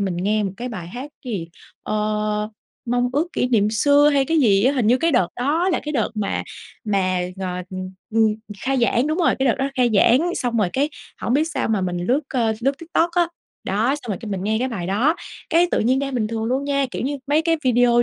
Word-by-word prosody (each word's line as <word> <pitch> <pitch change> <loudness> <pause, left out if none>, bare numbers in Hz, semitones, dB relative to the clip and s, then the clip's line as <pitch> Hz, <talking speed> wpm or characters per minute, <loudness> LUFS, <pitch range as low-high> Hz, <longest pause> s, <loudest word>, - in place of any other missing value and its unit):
mình 190 -3 -1
nghe 210 +4 +1
một 195 - -2
cái 250 +1 -5
bài 180 -7 -6
hát 255 +9 -7
cái 250 - -4
gì, 170 -5 -4 0.3
ơ, 210 0 -1 0.4
"Mong 245 +1 +1
Ước 300 +5 +1
Kỷ 250 - 0
Niệm 215 -3 +3
Xưa" 285 +6 +4
hay 275 -1 +3
cái 325 +4 +1
gì 200 -3 +4
á, 265 - +4
hình 255 -6 0
như 240 +3 +5
cái 330 -1 +1
đợt 185 -9 +3
đó 310 +9 +1
là 355 - +1
cái 300 - -3
đợt 230 -6 0
mà 210 -2 -1 0.4
mà 185 -3 +1 0.2
g 190 - -7 0.3
ừm, 185 0 -5 0.2
ừm, 220 -1 +3 0.3
khai 270 +1 0
giảng, 240 +3 +2
đúng 310 +3 -1
rồi, 335 - +3
cái 265 -1 +2
đợt - - +3
đó 270 +1 0
khai 250 -3 +2
giảng. 260 - +4
Xong 245 -2 -1
rồi 205 -5 +2
cái 280 +3 +1 0.3
hổng - - -1
biết 300 - +3
sao 320 -7 -2
mà 215 -3 +1
mình 180 -1 -2
lướt, 265 +5 +2
ơ, 230 -4 +1
lướt 270 +3 +2
TikTok 335 0 0
á, 345 -1 +2 0.4
đó, 220 +8 +1
xong 245 - -11
rồi 205 - -1
cái 220 - -7
mình 190 -2 -3
nghe 220 +1 +1
cái 255 +2 0
bài 195 -8 -4
đó, 230 - +2 0.4
cái 340 +2 +4
tự - - +1
nhiên 255 +4 +2
đang 275 -1 -2
bình 225 -4 0
thường 225 0 -3
luôn 260 +4 0
nha, 280 -1 +1
kiểu - - -4
như, 285 +3 -1
mấy 300 +3 +2
cái 330 0 +2
video 245 -1 +4
245 Hz, 250 wpm, -22 LUFS, 210-280 Hz, 0.4 s, như